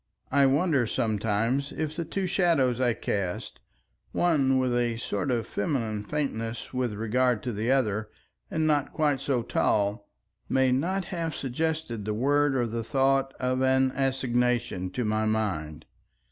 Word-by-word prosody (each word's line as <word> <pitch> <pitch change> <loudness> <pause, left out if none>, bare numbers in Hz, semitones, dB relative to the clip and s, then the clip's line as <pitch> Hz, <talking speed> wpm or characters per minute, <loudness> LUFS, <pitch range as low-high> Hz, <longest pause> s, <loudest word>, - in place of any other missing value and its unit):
I 140 0 +5
wonder 140 -3 +2
sometimes 115 +5 0
if 155 -1 -3
the 170 - -3
two 190 +4 -2
shadows 165 -9 +2
I 120 -3 +2
cast, 95 -3 -3 0.5
one 140 -7 +3
with 130 -1 +1
a 120 -1 0
sort 120 +3 -2
of 120 -3 0
feminine 110 -2 -2
faintness 115 -4 -3
with 125 -3 -1
regard 120 +1 +1
to 125 - -2
the 110 +4 -2
other 110 -5 +1 0.4
and 160 - 0
not 145 -2 +1
quite 145 -4 +1
so 135 -4 0
tall, 100 -1 0 0.4
may 130 -1 +3
not 180 +9 0
have 165 -2 -2
suggested 140 -3 -2
the 105 0 -1
word 145 +4 +2
or 125 -2 +2
the 115 0 -3
thought 135 +2 +2
of 130 0 0
an 130 0 +3
assignation 125 -7 0
to 115 +6 -3
my 110 0 +1
mind. 95 -9 -2
130 Hz, 150 wpm, -27 LUFS, 110-140 Hz, 0.5 s, I